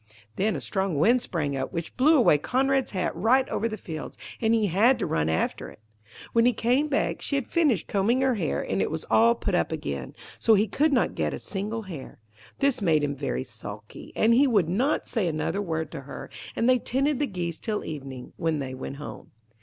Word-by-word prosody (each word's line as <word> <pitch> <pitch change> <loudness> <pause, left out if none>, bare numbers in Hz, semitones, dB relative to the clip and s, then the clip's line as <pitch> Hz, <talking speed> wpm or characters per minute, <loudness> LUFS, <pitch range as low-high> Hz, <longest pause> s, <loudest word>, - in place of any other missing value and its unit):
Then 205 0 +1
a 140 - -4
strong 190 0 -1
wind 235 - +4
sprang 150 - -2
up, 130 - -3
which 165 -1 -5
blew 300 +5 +5
away 215 - +5
Conrad's 270 - +1
hat 185 -2 -2
right 245 +9 +3
over 230 - -1
the 215 - -5
fields, 160 -5 -7 0.2
and 225 -1 +2
he 225 -2 +3
had 215 +8 +4
to 235 - -2
run 80 0 0
after 80 - -1
it. - - -15 0.5
When 230 - +4
he 250 - +3
came 250 +7 +1
back, 290 -1 0
she 280 - -2
had 275 -4 0
finished 290 - +2
combing 220 +6 +1
her 265 -1 +3
hair, 185 -9 -1
and - - -1
it - - 0
was 160 0 -4
all 230 +1 +5
put 205 -4 -3
up 175 - +1
again; 70 - -4 0.2
so 225 - +5
he 210 +2 +2
could 295 +9 +2
not 255 -4 +2
get 75 -3 -1
a - - -7
single 210 +3 -4
hair. 170 -9 -9 0.4
This 275 -3 +1
made 160 -6 +3
him 145 -1 -1
very 65 - -2
sulky, - - -9
and 225 +2 +4
he 275 +4 +5
would 205 -10 +3
not 255 - +1
say 220 -7 -1
another 165 +5 -1
word 160 -5 -3
to 150 - -6
her. 135 - -9 0.2
And 230 - +1
they 255 -1 +5
tended 275 +4 0
the 290 - +1
geese 175 -5 -4
till 215 -2 -3
evening, 135 -4 -7
when 165 -1 0
they 135 -2 -4
went 130 +1 -6
home. 145 +1 -9
205 Hz, 220 wpm, -26 LUFS, 155-245 Hz, 0.5 s, blew